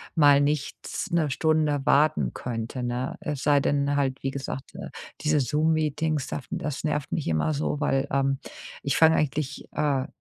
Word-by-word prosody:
mal 145 -3 +6
nichts 145 0 -2
'ne 165 -3 +2
Stunde 155 0 +1
warten 140 - +3
könnte, 120 +1 -4
ne? 125 +2 -2
Es 145 -3 -4
sei 145 -1 +4
denn 140 0 +1
halt, 135 -2 -1
wie 135 - 0
gesagt, 135 -1 -6
äh, - - -7 0.3
diese 150 0 +2
Zoom 150 +4 +2
Meetings, 155 -1 0
daf 140 - -5
das 150 -2 -3
nervt 150 -2 -1
mich 155 - -2
immer 80 - +1
so, 150 0 -1
weil, 135 -2 +1
ähm, 135 0 +1 0.4
ich 140 - 0
fang 160 0 +6
eigentlich, 150 -1 -1
ah, 140 -2 0
145 Hz, 170 wpm, -26 LUFS, 135-150 Hz, 0.4 s, mal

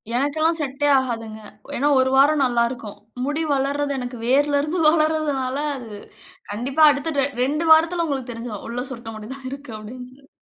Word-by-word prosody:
எனக்கெல்லாம் 310 +5 +1
செட்டே 290 0 -1
ஆகாதுங்க. 225 -4 -4 0.4
ஏன்னா, 285 +4 +1
1 260 0 +3
வாரம் 285 +2 +5
நல்லா 240 -1 +2
இருக்கும். 230 -5 -8 0.3
முடி 295 +3 -1
வளர்றது 280 +1 0
எனக்கு 245 0 -6
வேரில 285 +3 +3
இருந்து 305 +5 -2
வளர்வதால, 305 -4 0 0.2
அது 235 -4 -10 0.6
கண்டிப்பா 265 +8 0
அடுத்த 290 +2 -3
ட 270 - +3 0.2
2 300 +5 0
வாரத்தில 335 +2 +4
உங்களுக்கு 270 -5 -3
தெரிஞ்சிரும். 230 -3 -7
உள்ள 245 +2 -3
சுருட்ட 235 -3 -7
முடி 215 +2 -9
தான் 265 -1 -9
இருக்கு, 275 -3 -8
அப்பிடீன்னு 250 +4 -9
சொல்லி. 275 +1 -21
275 Hz, 165 wpm, -22 LUFS, 245-295 Hz, 0.6 s, வாரம்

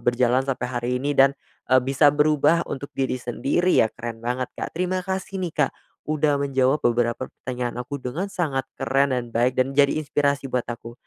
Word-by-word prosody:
berjalan 120 +1 +2
sampai 130 -2 -2
hari 120 -1 -2
ini 145 +2 -1
dan, 135 0 +5 0.4
eee, 130 0 +6
bisa 135 +3 +4
berubah 150 +3 +3
untuk 140 +1 -5
diri 130 -1 0
sendiri 135 +10 +1
ya. - - +2
Keren 120 -1 -6
banget 125 +1 -1
Kak, - - -4
terima 185 +2 -1
kasih 190 0 -4
nih 175 -3 -3
Kak - - -8 0.3
udah 150 -1 +1
menjawab 135 0 +1
beberapa 120 +1 +1
pertanyaan 125 -1 -4
aku 135 +4 -5
dengan 140 +9 -4
sangat 140 -9 -2
keren 140 +1 +2
dan 120 -2 -5
baik 120 +2 +1
dan 130 +1 +1
menjadi 140 0 +3
inspirasi 140 -2 0
buat 125 -1 0
aku. 120 0 -6
135 Hz, 185 wpm, -24 LUFS, 125-145 Hz, 0.4 s, eee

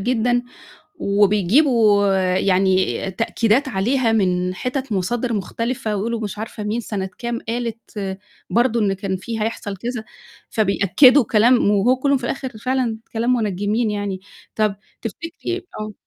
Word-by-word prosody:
جدًا، 245 +2 +1 0.5
وبيجيبوا 205 - +3 0.2
يعني 190 0 +3 0.3
تأكيدات 230 +6 +1
عليها 230 +3 +1
من 180 -3 +1
حتت 255 +3 -3
مصادر 230 +6 -1
مختلفة 220 +2 -2
ويقولوا 230 +3 -2
مش 210 -1 -5
عارفة 220 0 -6
مين 215 +3 -1
سنة 195 -4 -4
كام 235 -1 -3
قالت 225 -4 -4 0.3
برضه 235 0 +2
إن 200 -2 +2
كان 195 0 -3
في 220 +4 -5
هيحصل 210 -2 -3
كذا، 235 +2 -4 0.5
فبيأكّدوا 225 +6 +5
كلام 225 0 +4
وهو 210 +6 +3
كلّه 280 +1 +2
في 250 - -5
الآخر 265 +1 -3
فعلًا 245 -1 -1
كلام 235 +2 +1
مُنجّمين 210 +1 0
يعني. 205 -2 -3 0.3
طب 210 -2 +1 0.3
تفتكري 330 - -5
آه. 215 0 -5
220 Hz, 130 wpm, -21 LUFS, 200-245 Hz, 0.5 s, فبيأكّدوا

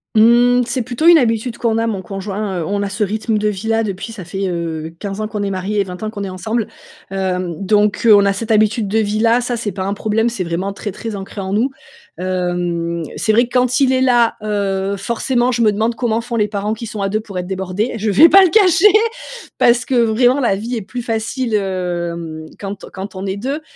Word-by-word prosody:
Mmh. 240 +3 +5
C'est 250 +2 -2
plutôt 245 +6 -3
une 345 -1 +9
habitude 230 -1 0
qu'on 225 -2 0
a, 225 - +1
mon 210 -4 -2
conjoint, 195 0 -4
heu, - - -3
on 200 +4 -1
a 200 - -2
ce 210 +3 -1
rythme 215 +2 -1
de 210 0 0
vie-là 220 +3 0
depuis, 200 +2 -5
ça 205 -6 -9
fait, 195 +2 -3
heu, 165 -2 -4
15 200 +1 -5
ans 215 - -2
qu'on 210 -1 -4
est 200 - -2
marié 195 +2 -2
et - - +3
20 180 -2 -9
ans 215 - -3
qu'on 205 -2 -6
est 195 - -4
ensemble. 220 +4 -2 0.4
Hem, 185 -2 -2
donc, 210 +2 +2
heu, 220 -2 +8
on 200 0 +5
a 200 - +2
cette 220 +3 -5
habitude 215 0 +2
de 210 +3 0
vie-là, 220 +3 +2
ça, 245 0 -2
c'est 220 -3 -3
pas 190 +1 -4
un 195 +1 -1
problème. 220 +3 0
C'est 230 -6 -3
vraiment 180 +3 -3
très, 205 +1 -5
très 225 +3 -6
ancré 195 +1 -7
en 190 0 -4
nous. 230 +6 +2 0.5
Hem, 175 -2 -2
c'est 220 - +1
vrai 235 +2 +4
quand 250 +1 +1
il 265 -2 +3
est 260 - +2
là, 240 -3 +3
heu, 200 -2 -1
forcément, 240 +4 0
je 240 -1 -1
me 215 -2 +4
demande 220 +3 0
comment 230 -2 0
font 235 0 -5
les 210 -1 +2
parents 210 +1 -2
qui 225 +1 -6
sont 210 -1 -5
à 195 - 0
2 215 +2 0
pour 205 -3 -8
être 180 - -3
débordés. 190 +4 -2
Je 215 0 -1
vais 205 - +7
pas 390 - +8
le 370 - +4
cacher, 400 +1 +5 0.7
parce 240 +1 +3
que, 265 - -1
vraiment, 245 +2 +3
la 235 -7 +2
vie 230 +5 -4
est 225 - -3
plus 245 +5 -6
facile, 230 +1 -2
hem, 175 -5 -3
quand 200 -1 -6
quand 190 +1 -7
on 190 +1 -6
est 195 0 -2
2. 270 +8 -3
210 Hz, 235 wpm, -18 LUFS, 190-235 Hz, 0.7 s, une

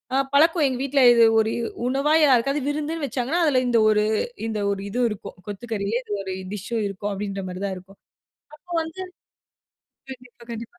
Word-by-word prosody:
அ - - +3 0.2
பழக்கம் 320 +2 +4
எங்க 260 -2 -2
வீட்ல 275 0 +1
இது 235 -1 +5 0.2
ஒரு 220 0 +1
இ - - -2 0.3
உணவா 275 +4 +1
யாருக்காவது 275 +2 +3
விருந்துனு 305 +1 -2
வச்சாங்கன்னா, 275 +6 -1
அதில 270 -5 +3
இந்த 240 -1 +3
ஒரு 210 -1 +3 0.4
இந்த 220 -1 -3
ஒரு 195 -1 -3
இது 245 +5 -3
இருக்கும். 205 -2 -8
கொத்துக்கறியே 205 +1 -3
இது 210 - -6
ஒரு 190 -1 -4 0.2
டிஸ்ஸோ 210 +3 -3
இருக்கும் 200 +1 -4
அப்படின்ற 195 -1 -4
மாரி 180 +1 -7
தான் 190 -2 -3
க்கும். 195 +1 -20 0.6
அப்ப 355 - -42
வந்து 320 +3 -8 1.1
கண்டிப்பா 250 -2 -12
கண்டிப்பா. 230 +9 -8
240 Hz, 175 wpm, -23 LUFS, 205-280 Hz, 1.1 s, இது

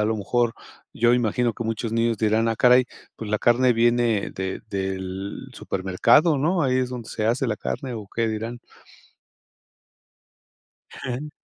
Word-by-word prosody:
a - - +2
lo 110 - 0
mejor 115 +3 0 0.4
yo 120 +1 +3
imagino 120 0 +1
que 115 - -6
muchos 115 0 -3
niños 115 0 +1
dirán: 110 +2 +1
"Ah 115 - -1
caray, 125 0 +5 0.3
pues 110 - -7
la 105 - +1
carne 120 +2 +3
viene 120 -2 +2
de 95 0 -4
del 95 0 -4
supermercado 115 - +2
¿no? 170 +4 +1
Ahí 130 -2 +2
es 130 -1 0
donde 120 -3 -7
se 110 - -2
hace 120 +4 +1
la 110 -3 -1
carne". 130 -4 -4
¿O 105 -3 -8
qué 115 -1 +1
dirán? 115 +2 -4 2.4
Ujú. 130 +4 -5
115 Hz, 155 wpm, -24 LUFS, 105-125 Hz, 2.4 s, caray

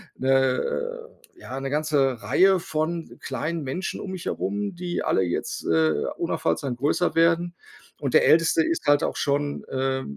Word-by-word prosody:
'ne, 130 - -2
äh 470 - -1
ja, 135 - -7
'ne 135 - -4
ganze 145 -5 +1
Reihe 185 - +4
von 165 -1 -3
kleinen 165 0 -3
Menschen 140 +8 -4
um 190 - -6
mich 185 -2 -6
herum, 100 - -2
die 175 0 -3
alle 95 - +2
jetzt, 85 -1 -3
äh, 80 -1 +2
unaufhaltsam 120 - -1
größer 150 +7 0
werden. 170 +1 +2 0.5
Und 140 -4 -2
der - - +6
Älteste 165 0 +4
ist 165 - -2
halt 145 0 +4
auch - - -1
schon, 145 0 -1
äh, 130 0 -1
150 Hz, 160 wpm, -25 LUFS, 130-175 Hz, 0.5 s, der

